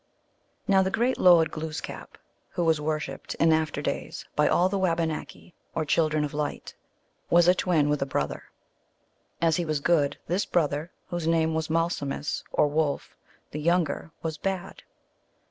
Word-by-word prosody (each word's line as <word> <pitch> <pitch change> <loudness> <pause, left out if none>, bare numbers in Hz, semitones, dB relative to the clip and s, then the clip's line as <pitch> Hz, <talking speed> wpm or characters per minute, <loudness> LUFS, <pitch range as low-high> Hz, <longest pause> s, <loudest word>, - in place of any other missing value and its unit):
Now 195 -1 +5
the 190 - +1
great 240 +6 0
lord 165 -3 +6
Glooskap, 155 0 -6 0.3
who 175 - -2
was 160 -2 +2
worshiped 155 0 -3
in 165 -1 +4
after 155 -2 0
days - - -4
by 150 - +3
all 180 - +3
the 195 +1 -1
Wabanaki, 165 -1 -2 0.2
or 160 - 0
children 155 0 +2
of 150 - -3
light, 145 0 -4 0.6
was 175 0 +5
a 180 - +7
twin 170 -5 +2
with 150 0 0
a 135 - 0
brother. 75 - -2 1.0
As 165 -1 +3
he 175 - 0
was 155 -3 -1
good, 145 -2 +2
this 185 +4 0
brother, 150 -1 0 0.2
whose 175 -2 -3
name 160 -1 +2
was 160 0 -2
Malsumsis, 160 -3 -1
or - - +3
Wolf 145 -1 -1 0.4
the 150 - -4
younger, 165 -1 0
was 160 -2 -3
bad. 195 -1 -4
160 Hz, 160 wpm, -27 LUFS, 150-175 Hz, 1.0 s, a